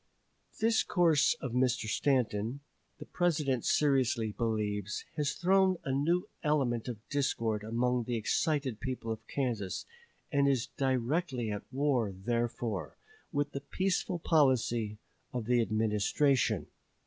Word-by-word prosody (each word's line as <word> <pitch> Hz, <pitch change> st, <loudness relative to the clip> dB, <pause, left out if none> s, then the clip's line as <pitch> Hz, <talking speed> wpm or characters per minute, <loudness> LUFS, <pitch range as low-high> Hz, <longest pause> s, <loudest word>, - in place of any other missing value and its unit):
This 225 Hz, 0 st, +3 dB
course 170 Hz, -7 st, +3 dB
of 130 Hz, -, -3 dB
Mr. 125 Hz, -2 st, +1 dB
Stanton, 120 Hz, +1 st, 0 dB, 0.4 s
the -, -, -9 dB
President 150 Hz, -8 st, 0 dB
seriously 130 Hz, -6 st, +2 dB
believes, 105 Hz, -3 st, -2 dB
has 150 Hz, -2 st, 0 dB
thrown 190 Hz, +1 st, +3 dB
a 135 Hz, -, -2 dB
new 165 Hz, +7 st, +1 dB
element 135 Hz, -7 st, +1 dB
of 115 Hz, -3 st, -7 dB
discord 115 Hz, -7 st, 0 dB
among 120 Hz, +2 st, 0 dB
the 120 Hz, -, -2 dB
excited 135 Hz, +1 st, 0 dB
people 125 Hz, -3 st, -4 dB
of 110 Hz, -, -6 dB
Kansas, 115 Hz, -9 st, -2 dB, 0.5 s
and 140 Hz, -2 st, +3 dB
is 130 Hz, -3 st, +1 dB
directly 130 Hz, -1 st, 0 dB
at 105 Hz, +3 st, -6 dB
war, 130 Hz, -6 st, +1 dB
therefore, 115 Hz, -1 st, -2 dB, 0.3 s
with 145 Hz, -1 st, -1 dB
the 140 Hz, -, -5 dB
peaceful 185 Hz, +4 st, -1 dB
policy 125 Hz, -9 st, +2 dB, 0.4 s
of 120 Hz, -3 st, -3 dB
the 120 Hz, +1 st, +3 dB
Administration. 110 Hz, +5 st, +1 dB
125 Hz, 125 wpm, -31 LUFS, 115-145 Hz, 0.5 s, This